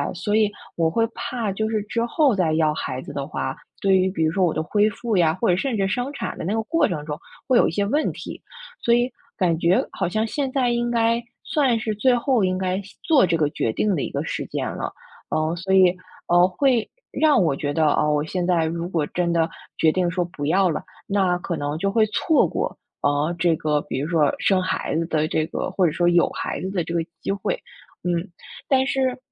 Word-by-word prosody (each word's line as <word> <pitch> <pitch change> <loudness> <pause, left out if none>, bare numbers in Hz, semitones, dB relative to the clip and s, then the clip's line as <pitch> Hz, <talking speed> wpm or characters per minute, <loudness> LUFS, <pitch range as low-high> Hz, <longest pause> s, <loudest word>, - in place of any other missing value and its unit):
所 205 +4 -1
以 215 -1 +3 0.2
我 165 -1 +2
会 225 +7 +2
怕 230 -5 -3
就 220 +2 -1
是 215 -2 -1
之 230 +2 -2
后 280 +1 +3
再 170 -5 +1
要 155 -1 +2
孩 130 -3 -4
子 - - -9
的 140 -1 -4
话， 135 -3 -3 0.2
对 195 -1 +3
于 185 0 +3
比 175 -4 -1
如 155 - +2
说 190 +3 +1
我 175 - +3
的 155 - -2
恢 210 +5 +2
复 225 +1 -3
呀， 170 -4 +4
或 - - +1
者 180 - +4
甚 235 +4 -1
至 195 -1 +1
生 245 +7 -2
产 285 - -5
的 - - -4
那 180 - -2
个 225 - 0
过 315 +4 +2
程 150 -4 -4
中 150 0 -5 0.3
会 260 - +3
有 - - +5
一 - - -1
些 200 +4 0
问 290 +9 +1
题。 - - -8 0.4
所 235 - +4
以 245 +1 +1 0.3
感 180 -6 +2
觉 175 +2 +2
好 185 -3 -2
像 215 +4 0
现 270 +3 -2
在 255 -2 +1
应 240 0 0
该， 230 0 +2 0.2
算 265 -6 +1
是 220 0 -2
最 245 +4 +3
后 245 -2 +1
应 185 0 +1
该 185 +1 -1
下 195 - -15
做 305 -5 +4
这 170 - +1
个 155 -2 +2
决 115 - -1
定 200 - +1
的 145 - -1
一 - - -3
个 - - -3
时 - - -3
间 - - -3
了。 - - -4 0.4
呃， 155 +1 0
所 185 +2 -4
以， 185 -1 +5 0.3
呃， 175 +1 +5
会 240 +4 +1 0.2
让 305 -10 +4
我 155 -5 +1
觉 145 +1 -2
得 155 +2 +2
啊， 150 +1 +2
我 150 0 +1
现 175 +2 -2
在 170 -3 +2
如 170 +2 -3
果 165 -5 0
真 175 +3 -1
的 165 -1 +2 0.3
决 160 - +4
定 180 +1 +1
说 180 0 -1
不 150 -5 -5
要 190 +4 +3
了， 160 - -2 0.2
那 190 -3 +1
可 175 -1 -4
能 145 0 -3
就 195 +4 0
会 215 +1 +3
错 305 +8 +2
过， - - -3 0.3
啊， 145 +3 +1
这 170 -1 +3
个 150 -1 0
比 130 - -4
如 145 - -2
说 155 -4 +3
生 190 -2 +3
孩 185 - -2
子 165 +1 0
的 155 -2 0
这 155 0 0
个 160 - -3
或 190 - +1
者 165 - +2
说 175 +3 +2
有 175 0 +4
孩 - - -4
子 190 - -3
的 185 -3 -1
这 165 - -7
个 170 -1 0 0.2
机 - - -2
会， 200 - -1 0.5
嗯。 175 +1 -1 0.4
但 265 -1 +3
是 260 -2 0
185 Hz, 260 characters per minute, -23 LUFS, 165-225 Hz, 0.5 s, 有